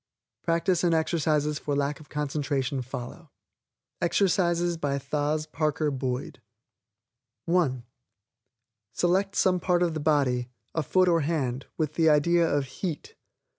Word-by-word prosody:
Practice 170 +1 +1
and 170 -2 +3
exercises 155 -2 +1
for 145 - -2
lack 140 0 -1
of 150 - -15
concentration 140 -2 -2
follow. 125 +6 -8 0.7
EXERCISES 175 -1 +2
By 145 -3 -1
Thos. 150 +2 -1
Parker 155 0 -1
Boyd 130 -1 -4 1.0
(1) 160 -8 +1 1.1
Select 195 +3 +1
some 185 -1 +3
part 180 0 +2
of 170 -2 0
the 155 - -3
body, 135 -5 +1 0.2
a 160 - 0
foot 185 +5 +2
or 170 -2 +3
hand, 140 -4 -2
with 155 -2 -1
the 160 0 +3
idea 165 +3 +4
of 145 -1 +1
HEAT. 170 -7 -4
155 Hz, 130 wpm, -27 LUFS, 140-170 Hz, 1.1 s, idea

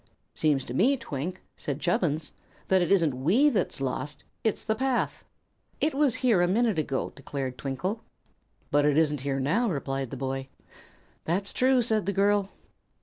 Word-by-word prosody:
"Seems 145 -4 +1
to 120 - -6
me, 250 - +3
Twink," 170 - -5
said 145 -1 -4
Chubbins, 160 -3 0 0.4
"that 190 -1 +4
it 175 - 0
isn't 165 -8 +4
we 250 - +4
that's 210 - -1
lost. 135 +2 -3 0.2
It's 220 - 0
the 220 - +1
path." 260 +2 -1 0.6
"It 310 - +1
was 275 -3 +2
here 220 -8 +5
a 175 - +3
minute 215 -1 +2
ago," 140 -3 -2
declared 135 -2 -4
Twinkle. 180 - -3 0.7
"But 145 0 +4
it 145 0 +3
isn't 150 -2 +2
here 135 0 -1
now," 195 - +1
replied 135 -5 -2
the - - -6
boy. 135 0 -3 0.8
"That's 190 +5 -1
true," 255 -1 +3
said 220 -5 +1
the 200 - +1
girl. 200 0 +2
175 Hz, 165 wpm, -27 LUFS, 140-220 Hz, 0.8 s, here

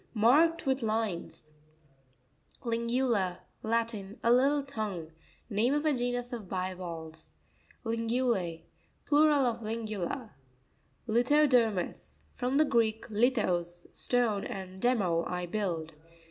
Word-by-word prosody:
— - - -36
Marked 300 +11 +4
with 265 0 +1
lines. 190 -8 -2 1.1
Lr'neuta.—Latin. 230 -2 -1
A 235 - +5
little 280 +3 +3
tongue. 210 - -4 0.4
aa 230 +7 +2
of 295 +1 -1
a 305 - +3
genus 245 0 -2
of 215 -6 -6
bivalves 175 - -4 0.5
(page 230 0 -1
9). 230 - -2
Li' 235 +2 +1
nevLa2.—Plural 255 - +1
of 240 -1 0
Lingula. 215 0 -4 0.8
Lirno'pomus. 240 -4 +2
— - - -36
From 255 +2 +1
the 310 - +5
Greek, 225 -4 +1
lithos, 185 -7 +1
stone, 235 -5 +1
and 190 -1 -7
demé, 190 -9 +2
I 180 0 -2
build. 170 -4 -2
225 Hz, 115 wpm, -30 LUFS, 185-245 Hz, 1.1 s, A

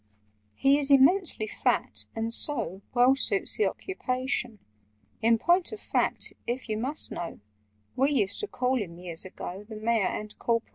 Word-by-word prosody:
"He 275 +1 +4
is 285 -1 +2
immensely 280 - +4
fat, 215 - -1
and 225 0 -2
so 230 - 0
Well 250 +2 +5
suits 390 +8 +3
the 435 - +3
occupation: 255 - -3 0.6
In 230 +1 +4
point 350 +8 +2
of 435 - -7
fact, - - 0
if 250 +2 -3
you 215 -1 -2
must 275 +6 -1
know, 170 - -6 0.6
We 270 +2 +3
used 210 -9 0
to 420 - -3
call 255 - 0
him 170 -4 -7
years 175 -1 -4
ago, 185 +1 -7
The 220 - -7
Mayor 220 -2 +1
and 210 0 -5
Corporation! 230 -1 0
245 Hz, 160 wpm, -28 LUFS, 215-275 Hz, 0.6 s, Well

